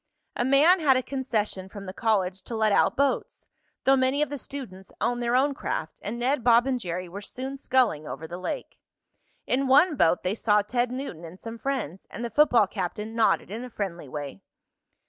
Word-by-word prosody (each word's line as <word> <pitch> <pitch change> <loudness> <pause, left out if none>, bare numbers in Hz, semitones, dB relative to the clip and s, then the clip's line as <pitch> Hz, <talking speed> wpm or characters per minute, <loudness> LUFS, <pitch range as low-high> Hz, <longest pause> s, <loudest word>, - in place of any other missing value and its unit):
A - - 0
man 290 +8 +5
had 275 -5 +4
a 255 - -1
concession 220 -8 -2
from 200 0 -9
the 185 - -6
college 195 -4 0
to 235 - -5
let 220 -1 +2
out - - +3
boats, 280 0 0 0.4
though 270 - +5
many 265 +2 +2
of 300 - -3
the 290 - -3
students 195 -11 -8
owned 245 0 0
their 240 0 +1
own 280 +3 +3
craft, 160 - -4
and 215 +4 -4
Ned, 255 +2 0
Bob 240 0 +5
and 260 -2 0
Jerry 180 -3 -4
were 195 +4 -8
soon 260 +6 -6
sculling 245 - +1
over 160 - -6
the 175 +2 -7
lake. 185 - -5 0.7
In 270 +2 +1
one 295 +5 +5
boat 170 -7 +3
they 185 - 0
saw 210 -1 +2
Ted 240 +3 0
Newton 255 - -6
and 170 +3 -10
some 230 0 -8
friends, 240 - -3
and 235 - -5
the 235 - -5
football 245 -4 +5
captain 210 +3 -4
nodded 225 -4 +2
in 225 +4 -5
a 250 - -7
friendly 175 - -5
way. 140 -8 -6
230 Hz, 205 wpm, -26 LUFS, 190-265 Hz, 0.7 s, man